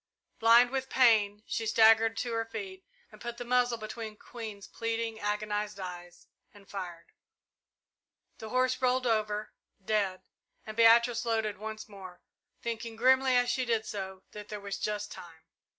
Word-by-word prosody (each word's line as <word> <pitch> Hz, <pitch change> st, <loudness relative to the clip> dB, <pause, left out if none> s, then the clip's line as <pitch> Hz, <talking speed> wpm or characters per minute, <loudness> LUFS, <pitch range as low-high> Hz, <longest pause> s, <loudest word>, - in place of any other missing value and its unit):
Blind 235 Hz, +2 st, +6 dB
with 265 Hz, 0 st, -2 dB
pain, 215 Hz, -5 st, +4 dB
she 225 Hz, -, -3 dB
staggered 225 Hz, 0 st, +5 dB
to 240 Hz, -, -2 dB
her 225 Hz, 0 st, 0 dB
feet, 380 Hz, -, -7 dB, 0.4 s
put 235 Hz, 0 st, -6 dB
the 245 Hz, -, -6 dB
muzzle 245 Hz, -1 st, +2 dB
between 215 Hz, 0 st, -7 dB
Queen's 215 Hz, -5 st, -8 dB
pleading, 230 Hz, -1 st, -3 dB
agonized 210 Hz, 0 st, -2 dB
eyes, 175 Hz, -1 st, -8 dB, 0.3 s
and 200 Hz, -1 st, -17 dB
fired. 175 Hz, -4 st, -7 dB, 1.3 s
The 220 Hz, -, -7 dB
horse 255 Hz, +2 st, +1 dB
rolled 255 Hz, 0 st, +2 dB
over, 215 Hz, -2 st, 0 dB, 0.3 s
dead, 200 Hz, -3 st, 0 dB, 0.4 s
and 215 Hz, -, -7 dB
Beatrice 235 Hz, +1 st, +5 dB
loaded 220 Hz, -4 st, -1 dB
once 215 Hz, 0 st, -6 dB
more, 190 Hz, -4 st, -11 dB, 0.4 s
thinking 230 Hz, -1 st, -4 dB
grimly, 260 Hz, +2 st, +4 dB
as 245 Hz, 0 st, +3 dB
she 260 Hz, -, 0 dB
did 230 Hz, -3 st, 0 dB
so, 190 Hz, -3 st, -6 dB
that 210 Hz, 0 st, -9 dB
there 210 Hz, -, -5 dB
was 200 Hz, 0 st, -5 dB
just 210 Hz, 0 st, -3 dB
time. 165 Hz, -2 st, -11 dB
220 Hz, 150 wpm, -30 LUFS, 205-235 Hz, 1.3 s, Blind